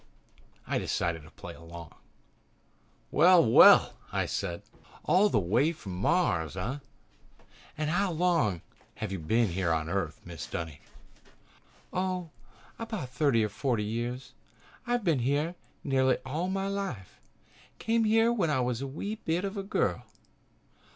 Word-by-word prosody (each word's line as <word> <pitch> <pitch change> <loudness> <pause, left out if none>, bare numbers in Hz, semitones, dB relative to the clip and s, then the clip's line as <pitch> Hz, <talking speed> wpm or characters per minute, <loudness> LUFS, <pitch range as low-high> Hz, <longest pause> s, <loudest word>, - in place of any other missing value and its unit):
I - - -1
decided 85 -2 -1
to 75 - -15
play 85 - -10
along. 85 -1 -11 1.2
"Well, 175 +2 +6
well," 110 - +7
I - - 0
said, 85 -1 -3 0.4
"all 200 +3 +4
the - - +1
way 115 - +2
from 100 - -9
Mars, 90 - +1
eh? 115 +10 -3 1.0
And 155 0 -1
how 190 +2 +1
long 160 - +1 0.3
have 110 -3 -5
you 95 - -3
been 100 +3 +1
on 80 -1 0
Earth, 90 -4 -2
Mrs. 85 -3 -8
Dunny?" 80 -4 -5 1.1
"Oh, 180 -2 -2 0.5
about 220 - -5
thirty 125 -3 +2
or - - -3
forty 115 0 -1
years. 120 +4 -4 0.5
I've 240 -1 0
been 165 -8 +2
here 145 +7 0 0.3
nearly 130 -2 +2
all 155 +7 -2
my 195 0 -1
life. 195 - -5 0.6
Came 225 0 +1
here 225 +2 +4
when 190 -9 0
I 145 -3 +1
was 125 -1 -1
a 135 - -3
wee 200 +10 -5
bit 170 +4 0
of 195 +1 -4
a 200 - -2
girl." 195 - -1
135 Hz, 140 wpm, -29 LUFS, -, 1.2 s, well